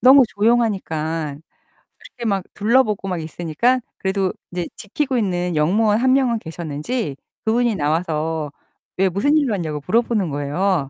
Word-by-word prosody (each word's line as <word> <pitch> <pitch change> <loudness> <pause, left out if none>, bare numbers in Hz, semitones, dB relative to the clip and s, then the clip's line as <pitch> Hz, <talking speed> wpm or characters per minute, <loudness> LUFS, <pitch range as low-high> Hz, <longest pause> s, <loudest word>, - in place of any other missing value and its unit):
너무 265 +1 +8
조용하니까 185 -10 0 0.7
이렇게 240 - -9
막 195 -3 0
둘러보고 215 -2 +2
막 180 -3 -2
있으니까 170 +10 0 0.2
그래도 190 -1 0 0.2
이제 175 -1 -3
지키고 260 +5 -2
있는 180 -5 0
역무원 205 +8 +3
1 260 +1 +4
명은 250 -4 +2
계셨는지 160 - -4 0.3
그분이 235 0 +2
나와서 155 -1 -1 0.5
왜 190 +1 +3
무슨 245 - +2
일로 280 -7 +2
왔냐고 155 -6 -3
물어보는 225 -3 +1
거예요. 145 +2 0
190 Hz, 330 characters per minute, -21 LUFS, 160-235 Hz, 0.7 s, 너무